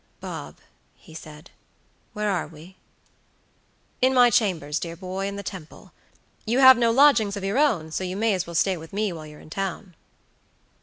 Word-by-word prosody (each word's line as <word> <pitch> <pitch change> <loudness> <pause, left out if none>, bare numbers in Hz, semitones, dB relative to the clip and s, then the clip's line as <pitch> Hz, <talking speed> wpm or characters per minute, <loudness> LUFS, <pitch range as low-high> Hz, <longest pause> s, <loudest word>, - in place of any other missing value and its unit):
"Bob," - - -8 0.4
he 160 - -18
said, 155 0 -12 0.6
"where 210 -1 -1
are 185 - -2
we?" 165 +4 -15 1.3
"In 260 +1 +3
my 245 -1 +6
chambers, 170 -10 0
dear 170 -1 -6
boy, 190 +2 -5
in 200 - -5
the 200 - -7
Temple. 180 -5 -10 0.5
You 235 +3 -1
have 260 -1 +9
no 235 -1 +2
lodgings 230 -5 +4
of 200 - -6
your 200 +7 0
own, 190 - +1
so 175 - -3
you 185 +1 -4
may 220 0 +1
as 185 -3 -2
well 170 - -8
stay 190 +2 +1
with 160 +2 -12
me 205 -2 -1
while 155 -2 -9
you're 150 0 -13
in 155 - -16
town." 195 +1 -5
195 Hz, 185 wpm, -24 LUFS, 165-220 Hz, 1.3 s, have